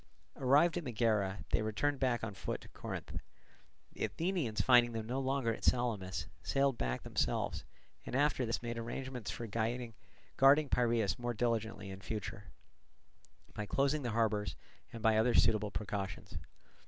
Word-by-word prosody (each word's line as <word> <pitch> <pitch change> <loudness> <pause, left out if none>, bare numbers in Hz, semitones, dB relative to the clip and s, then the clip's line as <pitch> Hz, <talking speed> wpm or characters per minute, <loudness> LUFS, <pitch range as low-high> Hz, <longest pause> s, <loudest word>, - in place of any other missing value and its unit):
Arrived 145 +7 +4
at - - -7
Megara, 110 -5 0
they - - +3
returned 130 +7 0
back 125 -3 +1
on 105 -2 -3
foot 95 - -4
to - - -12
Corinth. - - -6 0.8
The - - -1
Athenians 140 - -1
finding 120 +1 +5
them 110 -1 -3
no 125 +4 -2
longer 135 -3 0
at - - -9
Salamis, 110 -7 +1 0.2
sailed 135 -1 +2
back 60 - -2
themselves; - - -1 0.4
and - - -5
after 145 -1 +2
this 115 0 -2
made 120 0 -3
arrangements 125 0 -5
for 120 - -4
guarding 120 +5 +1
Piraeus 115 -5 +2
more 120 -1 -2
diligently 110 -4 -1
in 95 0 -8
future, 110 +1 -5 1.1
by 105 -1 -4
closing 140 +5 +1
the 125 - -2
harbours, 110 -2 0 0.4
and 115 -1 -8
by 110 -1 +5
other 115 +2 +3
suitable 105 -1 +4
precautions. 100 -2 -4
115 Hz, 150 wpm, -34 LUFS, 105-130 Hz, 1.1 s, finding